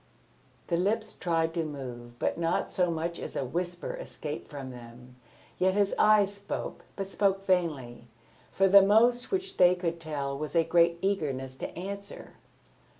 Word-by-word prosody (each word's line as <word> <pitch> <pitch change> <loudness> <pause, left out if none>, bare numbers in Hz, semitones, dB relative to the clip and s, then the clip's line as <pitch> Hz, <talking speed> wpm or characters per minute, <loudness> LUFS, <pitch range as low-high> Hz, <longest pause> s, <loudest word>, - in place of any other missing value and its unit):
The 170 - 0
lips 200 +6 0
tried 165 -2 0
to 165 -1 0
move, 125 -5 -7
but - - 0
not 170 +1 -1
so 180 -1 +1
much 170 +1 -3
as - - -7
a 135 - -1
whisper 175 +5 -3
escaped 150 0 -7
from 140 -3 -7
them. 125 +1 -12 0.4
Yet 185 +1 +3
his 205 -1 +2
eyes 210 -2 +4
spoke, 200 0 -6
but 195 - -3
spoke 195 0 0
vainly. 145 -11 -1 0.4
For 195 - +3
the 200 +1 +9
most 235 +5 +4
which 385 0 -2
they 180 0 +6
could 170 -2 -3
tell 145 -4 -3
was 155 +4 -5
a 165 - +5
great 170 0 +3
eagerness 140 -10 -1
to - - -4
answer. 200 +2 -7
170 Hz, 160 wpm, -29 LUFS, 145-195 Hz, 0.4 s, the